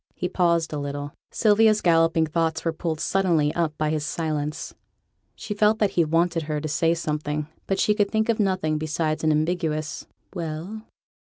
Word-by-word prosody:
He 180 Hz, -, -2 dB
paused 170 Hz, -3 st, +1 dB
a 150 Hz, -, -2 dB
little. 145 Hz, 0 st, -5 dB, 0.2 s
Sylvia's 215 Hz, 0 st, +4 dB
galloping 165 Hz, -2 st, +3 dB
thoughts 160 Hz, +1 st, -1 dB
were 165 Hz, -, +1 dB
pulled 160 Hz, -1 st, -3 dB
suddenly 170 Hz, -5 st, +1 dB
up 160 Hz, -3 st, -1 dB
by 155 Hz, 0 st, 0 dB
his 155 Hz, -1 st, -1 dB
silence; 150 Hz, -1 st, -3 dB, 0.6 s
she 215 Hz, -1 st, -5 dB
felt 210 Hz, +1 st, +3 dB
that 210 Hz, -3 st, +1 dB
he 170 Hz, -, +3 dB
wanted 165 Hz, +2 st, +1 dB
her 150 Hz, -1 st, 0 dB
to 155 Hz, -, -4 dB
say 165 Hz, +2 st, +1 dB
something, 150 Hz, -2 st, -3 dB, 0.2 s
but 195 Hz, -, 0 dB
she 210 Hz, -, +3 dB
could 205 Hz, -1 st, +1 dB
think 220 Hz, 0 st, +1 dB
of 230 Hz, -1 st, +1 dB
nothing 185 Hz, -6 st, +1 dB
besides 155 Hz, 0 st, -1 dB
an 155 Hz, -, +3 dB
ambiguous 155 Hz, -1 st, -1 dB, 0.3 s
'Well?' 170 Hz, +4 st, -5 dB
165 Hz, 175 wpm, -24 LUFS, 155-185 Hz, 0.6 s, Sylvia's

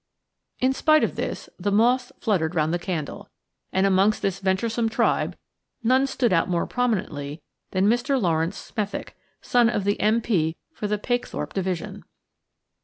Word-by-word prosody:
In 260 Hz, +1 st, +2 dB
spite 310 Hz, +2 st, +4 dB
of -, -, 0 dB
this -, -, -4 dB
the 200 Hz, +3 st, 0 dB
moths 245 Hz, +4 st, +3 dB
fluttered 180 Hz, -6 st, 0 dB
round 155 Hz, 0 st, +1 dB
the 175 Hz, -, 0 dB
candle, 170 Hz, -5 st, -4 dB, 0.4 s
and 190 Hz, +1 st, +2 dB
amongst 195 Hz, +2 st, +3 dB
this 195 Hz, -2 st, 0 dB
venturesome 225 Hz, +4 st, 0 dB
tribe 225 Hz, -, +1 dB, 0.5 s
none 260 Hz, +4 st, +4 dB
stood 250 Hz, -5 st, +1 dB
out 165 Hz, +1 st, +2 dB
more 175 Hz, -1 st, +1 dB
prominently 165 Hz, -, -2 dB, 0.3 s
than 190 Hz, 0 st, +1 dB
Mr. 245 Hz, +5 st, +2 dB
Laurence 165 Hz, -1 st, 0 dB
Smethick, 205 Hz, -2 st, -5 dB, 0.3 s
son 240 Hz, -2 st, +4 dB
of 210 Hz, -4 st, -1 dB
the 205 Hz, +1 st, 0 dB
M.P. 210 Hz, -7 st, +1 dB, 0.2 s
for 210 Hz, -, -3 dB
the 210 Hz, 0 st, 0 dB
Pakethorpe 245 Hz, +3 st, -3 dB
division. 185 Hz, -3 st, -3 dB
205 Hz, 150 wpm, -24 LUFS, 180-240 Hz, 0.5 s, spite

